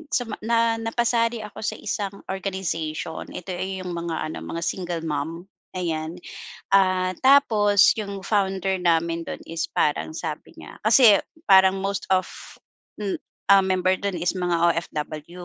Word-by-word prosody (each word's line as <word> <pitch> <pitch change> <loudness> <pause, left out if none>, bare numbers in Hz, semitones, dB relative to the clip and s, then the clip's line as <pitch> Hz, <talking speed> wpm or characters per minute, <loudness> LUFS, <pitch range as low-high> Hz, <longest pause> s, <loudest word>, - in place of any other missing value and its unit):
suma 230 -4 -2
na 230 0 +1
napasali 230 0 0
ako 210 - -10
sa 220 - -2
isang 200 -2 -4
organization 175 -5 -4
ito, 180 +1 -6
eh, 185 +1 -4
yung 180 - -5
mga 170 -2 -3
ano - - -6
mga 170 0 -5
single 175 -2 -3
mom. 160 +2 -3 0.3
Ayan, 170 -1 -3 0.5
ah, 185 -1 +3
tapos 220 -7 +5
yung 200 -2 -6
founder 195 -2 0
namin 170 -1 +1
dun - - -6
is 165 0 -3
parang 150 +1 -1
sabi 155 -3 -6
niya - - -12
kasi 220 -2 +6 0.2
parang 190 -1 +6
most 195 0 -3
of, 185 -1 +3 0.7
hmm, 205 -2 -3 0.3
um, 195 -1 +6
member 185 0 +2
dun 200 -2 -2
is 175 +1 0
mga 180 -2 0 0.2
OFW. 160 +1 -5
185 Hz, 145 wpm, -24 LUFS, 170-205 Hz, 0.7 s, kasi